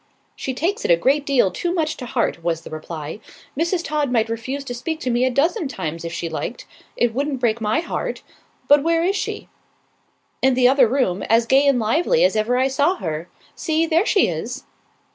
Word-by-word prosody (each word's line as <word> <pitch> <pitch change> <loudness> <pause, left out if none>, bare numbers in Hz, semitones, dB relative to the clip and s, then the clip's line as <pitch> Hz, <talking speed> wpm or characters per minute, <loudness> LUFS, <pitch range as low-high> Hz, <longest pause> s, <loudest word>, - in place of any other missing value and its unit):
"She 260 - -4
takes 360 +9 -1
it - - -1
a 170 - +7
great 280 - +1
deal 250 -9 +3
too 350 - -2
much 315 -3 0
to 250 - -7
heart," 170 - -1
was 165 -1 -1
the - - -11
reply. 155 +2 -6 0.4
"Mrs. 340 +4 0
Todd 295 -3 -1
might 225 -2 +1
refuse 255 +5 -4
to 250 - -6
speak 315 +6 -4
to 255 - -1
me 240 +2 +2
a - - +2
dozen 315 - +1
times, 165 - -5
if 170 - -5
she 175 0 -3
liked. - - -5 0.3
It 240 -2 +2
wouldn't 280 +1 -2
break 230 -2 0
my 215 +7 +1
heart. 340 - -4 0.4
But 290 0 +6
where 330 +2 +1
is 385 +3 +1
she?" - - -4 0.9
"In 265 -1 +3
the 250 -1 +5
other 260 -1 +5
room, 220 -7 0
as 230 +1 +4
gay 270 +4 +4
and 275 -2 +4
lively 330 - +2
as - - +3
ever 220 +3 +1
I 260 +1 +3
saw 285 +7 +2
her. 160 - -5 0.3
See, 320 0 0
there 330 +5 +2
she 400 - +4
is." 225 +11 -4
260 Hz, 210 wpm, -21 LUFS, 220-305 Hz, 0.9 s, a